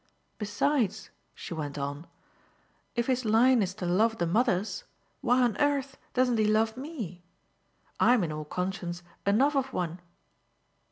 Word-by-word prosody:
Besides," 220 Hz, +2 st, 0 dB, 0.2 s
she -, -, -7 dB
went 150 Hz, -3 st, -4 dB
on, 145 Hz, +3 st, -4 dB, 0.9 s
"if 235 Hz, 0 st, +1 dB
his 255 Hz, 0 st, +1 dB
line 230 Hz, +3 st, +5 dB
is 190 Hz, -1 st, -1 dB
to 195 Hz, -, -5 dB
love 220 Hz, +6 st, +2 dB
the 170 Hz, -, 0 dB
mothers 210 Hz, -, +1 dB, 0.4 s
why 250 Hz, +1 st, +3 dB
on 235 Hz, -4 st, +2 dB
earth 280 Hz, -2 st, 0 dB, 0.2 s
doesn't 250 Hz, -2 st, +3 dB
he 215 Hz, -, +4 dB
love 220 Hz, +1 st, +2 dB
ME? 245 Hz, -, -6 dB, 0.8 s
I'm 245 Hz, -5 st, +5 dB
in 160 Hz, -, -2 dB
all 155 Hz, 0 st, -5 dB
conscience 180 Hz, +1 st, -3 dB, 0.2 s
enough 265 Hz, +9 st, +4 dB
of 270 Hz, -1 st, 0 dB
one." 175 Hz, 0 st, -2 dB
215 Hz, 145 wpm, -29 LUFS, 180-255 Hz, 0.9 s, line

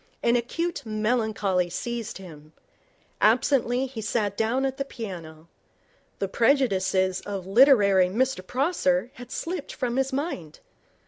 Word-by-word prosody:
An 235 Hz, -, +3 dB
acute 330 Hz, +8 st, -2 dB
melancholy 215 Hz, -5 st, 0 dB
seized 235 Hz, +4 st, -4 dB
him. 155 Hz, -5 st, -13 dB, 0.7 s
Absently, 255 Hz, -2 st, +3 dB
he 250 Hz, -4 st, -7 dB
sat 205 Hz, -1 st, -1 dB
down 235 Hz, +5 st, 0 dB
at 270 Hz, 0 st, -2 dB
the 275 Hz, -, -1 dB
piano. 170 Hz, -, -8 dB, 0.7 s
The 195 Hz, -, -2 dB
prejudices 190 Hz, -6 st, +2 dB
of 195 Hz, -3 st, -5 dB
literary 200 Hz, -4 st, +5 dB
Mr 245 Hz, +3 st, 0 dB
Prosser 250 Hz, -, 0 dB
had 245 Hz, 0 st, -11 dB
slipped 335 Hz, -3 st, -4 dB
from 250 Hz, -1 st, -2 dB
his 270 Hz, 0 st, +1 dB
mind. 265 Hz, -, -4 dB
225 Hz, 125 wpm, -26 LUFS, 190-265 Hz, 0.7 s, literary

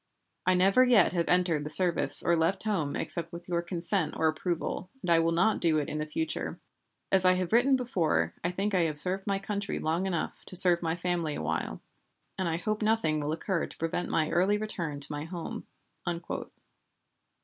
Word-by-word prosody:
I 185 Hz, -, +4 dB
never 195 Hz, +7 st, +4 dB
yet 245 Hz, -7 st, +4 dB
have 170 Hz, -2 st, -1 dB
entered 175 Hz, -4 st, +2 dB
the 150 Hz, -, -5 dB
service 175 Hz, +2 st, +6 dB
or 170 Hz, -, +3 dB
left 165 Hz, +4 st, 0 dB
home 190 Hz, -10 st, -1 dB
except 170 Hz, -1 st, -4 dB
with 170 Hz, 0 st, -9 dB
your 170 Hz, -1 st, -1 dB
consent 175 Hz, 0 st, -1 dB
or 160 Hz, -, +2 dB
approval, 170 Hz, +3 st, -3 dB
and 175 Hz, -, -1 dB
I 165 Hz, -, +5 dB
will 165 Hz, 0 st, +1 dB
not 190 Hz, +6 st, +2 dB
do 165 Hz, -3 st, +2 dB
it 150 Hz, -, -2 dB
in 150 Hz, -, -4 dB
the 155 Hz, -, -3 dB
future. 315 Hz, -, -4 dB, 0.5 s
As 190 Hz, -1 st, +4 dB
I 185 Hz, 0 st, +5 dB
have 185 Hz, +1 st, -2 dB
written 260 Hz, +3 st, +4 dB
heretofore, 160 Hz, -, 0 dB
I 170 Hz, -, 0 dB
think 195 Hz, +3 st, -2 dB
I 185 Hz, -, +3 dB
have 155 Hz, -2 st, -3 dB
served 190 Hz, +5 st, 0 dB
my 200 Hz, -1 st, +1 dB
country 200 Hz, +1 st, -4 dB
long 165 Hz, +5 st, -1 dB
enough 170 Hz, -4 st, -3 dB
to -, -, -8 dB
serve 180 Hz, -1 st, +6 dB
my 165 Hz, -1 st, -1 dB
family 175 Hz, -3 st, -2 dB
awhile; 80 Hz, +1 st, -4 dB, 0.5 s
and 185 Hz, -3 st, -2 dB
I 165 Hz, -, -1 dB
hope 215 Hz, +4 st, -3 dB
nothing 215 Hz, -8 st, +1 dB
will 150 Hz, 0 st, -2 dB
occur 170 Hz, +2 st, -2 dB
to -, -, -14 dB
prevent 165 Hz, +2 st, -3 dB
my 155 Hz, -1 st, 0 dB
early 190 Hz, +4 st, +2 dB
return 170 Hz, -9 st, -4 dB
to 140 Hz, -, -2 dB
my 150 Hz, +1 st, -4 dB
home." 170 Hz, 0 st, -7 dB
175 Hz, 200 wpm, -28 LUFS, 160-195 Hz, 0.5 s, service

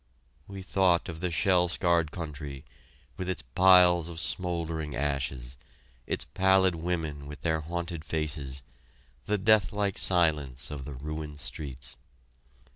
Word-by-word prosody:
We 100 Hz, -1 st, -8 dB
thought 95 Hz, -3 st, +2 dB
of 80 Hz, -2 st, -6 dB
the 90 Hz, +1 st, -1 dB
shell 90 Hz, +1 st, +3 dB
scarred 85 Hz, -2 st, +2 dB
country, 75 Hz, -4 st, -7 dB, 0.5 s
with 95 Hz, 0 st, -3 dB
its 90 Hz, -7 st, -3 dB
piles 90 Hz, +4 st, +5 dB
of 80 Hz, -1 st, -7 dB
smouldering 85 Hz, -5 st, -2 dB
ashes, 65 Hz, -2 st, -2 dB, 0.5 s
its -, -, -1 dB
pallid 95 Hz, -1 st, +3 dB
women 80 Hz, -4 st, -3 dB
with 75 Hz, +1 st, -9 dB
their 80 Hz, -1 st, 0 dB
haunted 85 Hz, 0 st, -4 dB
faces, 75 Hz, -4 st, -2 dB, 0.6 s
the 105 Hz, -, +1 dB
deathlike 105 Hz, -1 st, +2 dB
silence 75 Hz, -8 st, +1 dB
of 70 Hz, -3 st, -6 dB
the 70 Hz, -, -7 dB
ruined 75 Hz, +2 st, -6 dB
streets. 65 Hz, -4 st, -6 dB
80 Hz, 125 wpm, -29 LUFS, 75-90 Hz, 0.6 s, piles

